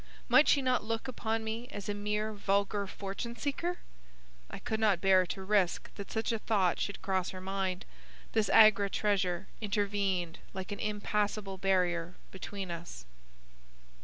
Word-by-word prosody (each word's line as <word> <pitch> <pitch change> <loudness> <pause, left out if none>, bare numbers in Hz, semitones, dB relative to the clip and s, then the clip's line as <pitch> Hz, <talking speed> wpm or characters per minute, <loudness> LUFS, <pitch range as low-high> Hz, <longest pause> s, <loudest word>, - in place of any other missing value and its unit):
Might - - +6
she 280 - +4
not 255 -3 +2
look 225 +3 -3
upon 225 -3 -2
me 225 +2 -4
as 205 -4 -7
a 205 - 0
mere 210 +1 -2
vulgar 200 0 0
fortune 200 +5 -5
seeker? 295 +8 -2 0.7
I - - -7
could 220 - -3
not 210 -5 +3
bear 185 -1 +4
to 190 +2 -5
risk 190 -3 +1
that 200 - -8
such 220 +1 -1
a 225 - -1
thought 195 -6 +1
should 200 - -3
cross 190 -2 0
her 185 - -7
mind. 190 -1 -2 0.5
This 220 -2 +1
Agra 215 -2 +7
treasure 190 -3 0 0.2
intervened 200 -4 -1 0.2
like 190 +1 -5
an 205 - -4
impassable 210 -2 -1
barrier 180 -2 +1 0.2
between 190 -1 -6
us. 165 - -7
200 Hz, 155 wpm, -32 LUFS, 190-215 Hz, 0.7 s, Agra